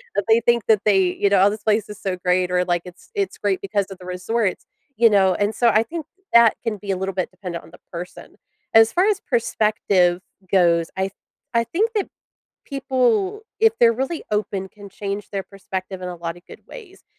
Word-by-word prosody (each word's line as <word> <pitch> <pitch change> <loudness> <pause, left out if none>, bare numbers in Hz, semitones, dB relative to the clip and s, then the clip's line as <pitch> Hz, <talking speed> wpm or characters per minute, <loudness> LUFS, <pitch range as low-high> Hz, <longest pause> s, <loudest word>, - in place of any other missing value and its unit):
but 205 -1 0
they 225 +1 +5
think 235 -1 +2
that 215 -3 +4
they 200 -2 +4
you 200 - +1
know, 200 -2 +4
"Oh, 205 - +5
this 210 0 -6
place 215 0 +1
is 210 0 -10
so 190 -2 -2
great," 180 0 +1
or, 180 0 +2
like, 175 -1 0
"It's 180 0 -14
it's 400 -2 -2
great 200 -2 -1
because 200 0 -1
of 195 - -9
the 180 - -12
resorts," 185 +3 -2 0.3
you 230 -1 +6
know? 195 -3 +4
And 205 +1 0
so 240 - +4
I 220 0 +4
think 315 +5 -6 0.3
that 235 -1 +6
can 220 -2 -2
be 200 0 -5
a 190 - -1
little 190 +1 -3
bit 185 0 -2
dependent 180 -2 -7
on 160 - -16
the 180 - -16
person. 175 +2 -8 0.4
As 225 0 +7
far 365 +3 +2
as 415 -2 +1
perspective 210 -7 +1 0.3
goes, 170 -3 +3
I 190 - +1
th 195 0 -3 0.4
I 230 0 +3
think 430 - -1
that 415 -3 -1 0.6
people, 275 - 0 0.2
if 445 0 +5
they're 230 -1 +6
really 315 +5 -4
open, 200 -2 -2
can 205 -1 -12
change 200 +1 -5
their 195 -1 -3
perspective 190 -1 -7
in 180 - -4
a 180 - -6
lotta 170 0 -6
good - - -14
ways, 390 -6 -13
205 Hz, 215 wpm, -22 LUFS, 185-235 Hz, 0.6 s, As